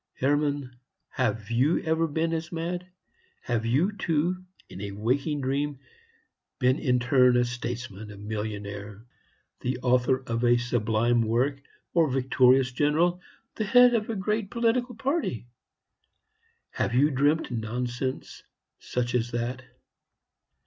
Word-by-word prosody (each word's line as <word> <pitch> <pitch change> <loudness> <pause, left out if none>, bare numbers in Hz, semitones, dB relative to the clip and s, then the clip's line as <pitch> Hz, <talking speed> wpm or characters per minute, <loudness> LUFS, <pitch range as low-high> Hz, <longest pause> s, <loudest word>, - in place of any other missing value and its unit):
Hermann, 145 -1 0 0.3
have 110 -4 -2
you 130 +8 +3
ever 160 +1 +1
been 160 +2 -1
as 160 0 -3
mad? 175 +2 -3 0.6
Have 115 -2 -1
you, 150 - +2
too, 180 -1 -1 0.2
in 95 - -9
a 100 -1 -5
waking 135 +8 -1
dream, 140 +2 -1 0.8
been 130 +2 +2
in 125 -2 +2
turn 125 0 +4
a 125 - +3
statesman, 120 -3 -5
a 105 - -10
millionaire, 105 0 -6 0.5
the 125 0 -2
author 125 +1 +2
of 115 -1 -2
a 120 0 +5
sublime 120 -1 +1
work, 125 +5 0 0.3
a 165 -3 +4
victorious 130 0 +3
general, 160 +7 +1 0.3
the 220 - -2
head 245 +3 +6
of 220 -2 0
a 225 - -1
great 210 +1 -1
political 240 +2 0
party? 255 - -2 1.3
Have 120 - -1
you 145 +4 +4
dreamt 145 +2 +1
nonsense 120 +3 -4 0.4
such 120 -1 -2
as 120 -1 0
that? 120 +1 -3
130 Hz, 130 wpm, -27 LUFS, 120-160 Hz, 1.3 s, head